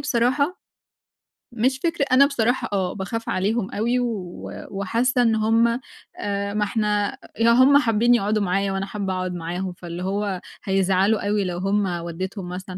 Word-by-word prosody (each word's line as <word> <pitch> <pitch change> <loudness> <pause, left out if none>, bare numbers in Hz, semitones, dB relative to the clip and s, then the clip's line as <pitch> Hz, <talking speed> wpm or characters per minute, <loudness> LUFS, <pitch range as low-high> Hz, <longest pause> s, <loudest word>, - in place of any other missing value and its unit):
بصراحة 280 +5 +1 0.9
مش 255 +3 0
فكر 330 -4 +1
أنا 270 +2 +7
بصراحة 250 -3 0
آه، 185 -2 0
باخاف 225 +4 -4
عليهم 200 +2 0
أوي 235 +4 0
و 210 -8 -4 0.2
وحاسّة 230 +6 +1
إن 225 -2 +3
هُم 230 +2 +2 0.4
آآ، 200 0 -2
ما 210 - +1
إحنا 210 -1 0 0.2
لو 230 +1 +5
هُم 260 +4 +6
حابّين 240 -2 +3
يقعُدوا 210 -1 +1
معايا 195 +1 0
وأنا 195 0 -2
حابة 195 -1 -3
أقعُد 185 0 -2
معاهم 175 +2 -4
فاللي 175 0 -7
هو 195 -1 -2 0.2
هيزعَلوا 195 +2 +2
أوي 205 -1 +1
لو 175 -1 -3
هُم 195 +2 +1 0.2
ودّيتهم 180 +2 -5
مثلًا 185 0 -6
205 Hz, 155 wpm, -23 LUFS, 190-235 Hz, 0.9 s, أنا